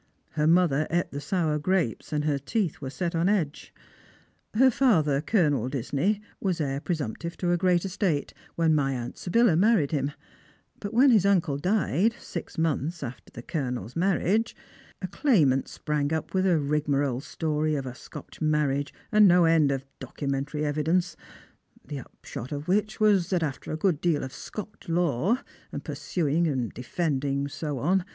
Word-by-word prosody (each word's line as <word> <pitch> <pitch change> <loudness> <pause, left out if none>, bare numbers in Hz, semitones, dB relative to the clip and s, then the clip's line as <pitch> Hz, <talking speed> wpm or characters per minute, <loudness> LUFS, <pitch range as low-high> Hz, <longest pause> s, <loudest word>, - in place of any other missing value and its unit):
" - - -43
Her 150 0 +1
mother 165 -3 +3
ate 175 +1 0
the 140 - -5
sour 155 0 0
grapes, 175 - -1
and 150 -1 -1
her 145 -2 +1
teeth 180 - -2
were 135 - -4
set 170 +5 -3
on 170 +3 +2
edge. 170 -8 -1 0.8
Her 260 +3 +6
father. 160 - +3
Colonel 150 - +1
Disney, 145 - -1 0.2
was 185 -3 -1
heir 140 -2 -1
pre 175 - -1
sumptive 160 +4 -5
to 175 -1 0
a 175 - +3
great 180 0 +2
estate, 185 -6 -1 0.2
when 165 -1 +3
my 140 -3 +1
aunt 120 -2 -5
Sybilla 225 0 +3
married 190 -5 +3
him; 140 -2 -1 0.7
but 205 - -5
when 255 +4 +5
his 215 -6 +5
uncle 180 -8 +2
died, 200 +4 +1
six 170 - -7
months 160 0 -1
after 125 -1 -8
the 120 - -9
Colouel's 125 - -4
mar 185 +1 +2
riage, 220 +5 0 0.5
a - - -1
claimant 165 - +2
sprang 150 -1 -2
up 160 -1 -2
with 190 0 +2
a 175 -3 +4
rigmarole 145 -3 0
story 155 0 -1
of 135 -2 -3
a 125 - -5
Scotch 130 - -11
marriage, 150 -2 +1 0.2
and 210 -1 +7
no 175 -1 +6
end 160 -3 +4
of 135 -1 -2
documentary 140 +3 -3
evidence, 160 +5 0 0.7
the 145 - -6
upahot 125 0 -9
of 145 +1 -5
which 210 +4 0
was, 205 -5 +3
that 180 -3 +1
after 145 -3 -4
a 155 - -2
good 160 -3 +1
deal 165 -4 +1
of 130 - -6
Scotch 210 -3 -8
law, 175 - +1 0.3
and - - -5
pursuing 165 0 0
and 130 -6 -2
defending 140 +1 -1
and 140 +2 -4
ao 150 -3 -2
on. 180 +8 +1
155 Hz, 175 wpm, -27 LUFS, 140-185 Hz, 0.8 s, and